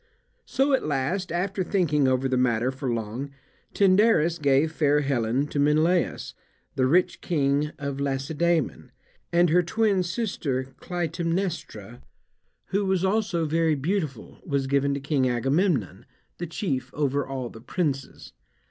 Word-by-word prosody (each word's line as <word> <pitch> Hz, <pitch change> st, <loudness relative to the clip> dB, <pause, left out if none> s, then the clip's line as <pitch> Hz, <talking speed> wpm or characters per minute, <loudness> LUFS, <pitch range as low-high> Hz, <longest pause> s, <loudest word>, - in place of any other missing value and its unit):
So 275 Hz, +1 st, +1 dB
at 265 Hz, -, +2 dB
last, 155 Hz, +7 st, -1 dB
after 190 Hz, +2 st, -1 dB
thinking 155 Hz, -8 st, +1 dB
over 130 Hz, +1 st, +1 dB
the 130 Hz, -, 0 dB
matter 125 Hz, 0 st, +1 dB
for 135 Hz, -1 st, -3 dB
long, 115 Hz, +4 st, -4 dB, 0.4 s
Tyndarus 190 Hz, -4 st, +3 dB
gave 140 Hz, +2 st, +3 dB
fair 150 Hz, -2 st, +2 dB
Helen 130 Hz, -1 st, 0 dB
to 145 Hz, -, -2 dB
Menelaus, 155 Hz, +5 st, +1 dB, 0.4 s
the 130 Hz, -1 st, +1 dB
rich 180 Hz, +7 st, +2 dB
King 145 Hz, -2 st, +1 dB
of 140 Hz, -2 st, -4 dB
Lacedaemon; 145 Hz, +4 st, -1 dB, 0.4 s
and 175 Hz, -1 st, +3 dB
her 180 Hz, +2 st, +5 dB
twin 200 Hz, +2 st, +1 dB
sister 165 Hz, -, -2 dB
Clytaemnestra, 170 Hz, -, -3 dB, 0.7 s
who 200 Hz, +2 st, +1 dB
was 190 Hz, -1 st, +1 dB
also 190 Hz, -4 st, 0 dB
very 160 Hz, 0 st, +2 dB
beautiful, 150 Hz, -, -3 dB
was 140 Hz, -5 st, -1 dB
given 140 Hz, +1 st, +1 dB
to -, -, -3 dB
King 135 Hz, -2 st, +1 dB
Agamemnon, 125 Hz, -, 0 dB, 0.3 s
the 175 Hz, -, -3 dB
chief 160 Hz, -5 st, -3 dB
over 145 Hz, -1 st, 0 dB
all 130 Hz, -2 st, -5 dB
the 110 Hz, -, -12 dB
princes. 140 Hz, -1 st, -3 dB
150 Hz, 135 wpm, -25 LUFS, 135-175 Hz, 0.7 s, her